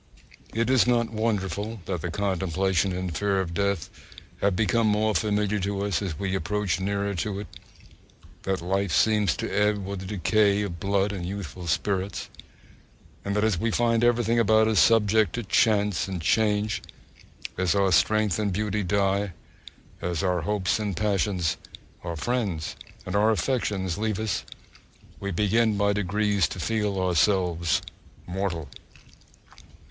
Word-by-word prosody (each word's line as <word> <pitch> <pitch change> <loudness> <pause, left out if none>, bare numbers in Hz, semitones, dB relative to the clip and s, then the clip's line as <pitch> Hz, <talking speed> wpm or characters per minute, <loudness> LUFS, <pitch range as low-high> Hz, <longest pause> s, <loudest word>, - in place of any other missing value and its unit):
It 115 0 +1
is 130 -2 +4
not 120 -2 +2
wonderful 105 -1 -2
that 90 -4 -3
the - - -3
contemplation 95 -1 0
and 90 -2 -3
fear 100 0 +1
of 90 -3 -2
death 100 -2 0 0.7
become 110 +2 +2
more 105 +1 +2
familiar 105 0 +1
to 100 +1 -2
us 100 0 0
as 90 -7 -3
we 95 +1 -2
approach 95 -2 -1
nearer 100 +1 -1
to 100 +2 -3
it: - - -7 1.0
that 95 -2 -2
life 95 +1 0
seems 105 - +3
to - - -3
ebb 105 -1 +1
with 100 0 -4
the 95 - -7
decay 105 +1 +2
of 85 -4 -5
blood 100 0 +1
and 95 -4 -5
youthful 90 -1 -6
spirits; 95 +3 -1 0.9
and 100 0 -2
that 105 - +1
as 110 -6 +1
we 115 - 0
find 115 0 +2
everything 120 -1 +3
about 110 0 +4
us 110 -4 +3
subject 110 -3 +4
to 120 - -3
chance 100 -4 +2
and 95 -2 -4
change, 105 +1 +1 0.7
as 95 0 +1
our 100 -1 +3
strength 110 +3 +3
and 105 -2 0
beauty 105 +2 -1
die, 100 0 0 0.7
as 90 0 -2
our 90 -2 +1
hopes 100 +4 0
and 100 -5 -3
passions, 95 -5 0 0.5
our 85 -1 -4
friends 100 -4 -2 0.3
and - - -4
our 105 +2 +4
affections 105 -6 -1
leave 110 -1 -1
us, 110 -1 -2 0.7
we 100 - -4
begin 105 +3 +2
by 100 0 +2
degrees 100 -2 +1
to 90 - -7
feel 105 -1 -1
ourselves 90 -1 +2 0.4
mortal! 90 -4 -3
100 Hz, 150 wpm, -26 LUFS, 95-105 Hz, 1.0 s, is